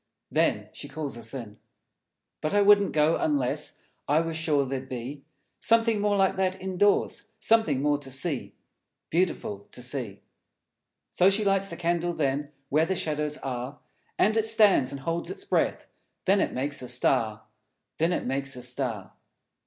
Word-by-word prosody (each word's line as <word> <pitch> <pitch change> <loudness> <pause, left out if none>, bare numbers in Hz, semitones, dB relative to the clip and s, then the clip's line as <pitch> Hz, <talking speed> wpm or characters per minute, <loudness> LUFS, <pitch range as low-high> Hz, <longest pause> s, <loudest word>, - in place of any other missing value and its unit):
Then - - +1
She - - -7
calls 145 -2 -4
us 115 -1 -5
in. 115 -6 -8 0.8
But 155 +6 -1
I 205 - +5
wouldn't 200 0 +5
go, 155 +1 +3
unless 140 -5 0 0.3
I 150 +2 +4
were 165 0 -3
sure 155 -3 +1
there'd 130 0 -4
be 130 +3 -6 0.4
Something 230 -2 +3
more 205 0 +2
like 190 0 +2
that, 190 0 0
indoors, 190 +2 +1
Something 160 -12 +2
more 145 -1 +2
to 140 -2 -7
see, 135 +2 -1 0.6
Beautiful 170 - 0
to - - -8
see. 125 -6 -4 0.9
So 185 - +5
She 205 +2 +1
lights 195 0 +2
the - - -7
candle 175 0 0
then, 145 -1 -1 0.2
Where 155 +3 +3
the 190 - 0
shadows 150 -2 -1
are, 130 +1 -4 0.4
And 215 +2 +3
it 220 -1 +2
stands, 210 - +4
and 140 -1 -6
holds 165 +4 -2
its - - -5
breath - - 0 0.4
Then 195 +1 +4
it - - 0
makes 140 +2 -1
a 125 - -6
Star, 110 -3 +1 0.6
Then 165 +2 +2
it - - -1
makes 135 +1 -2
a 125 - -7
Star! 125 -6 -3
150 Hz, 165 wpm, -27 LUFS, 135-190 Hz, 0.9 s, I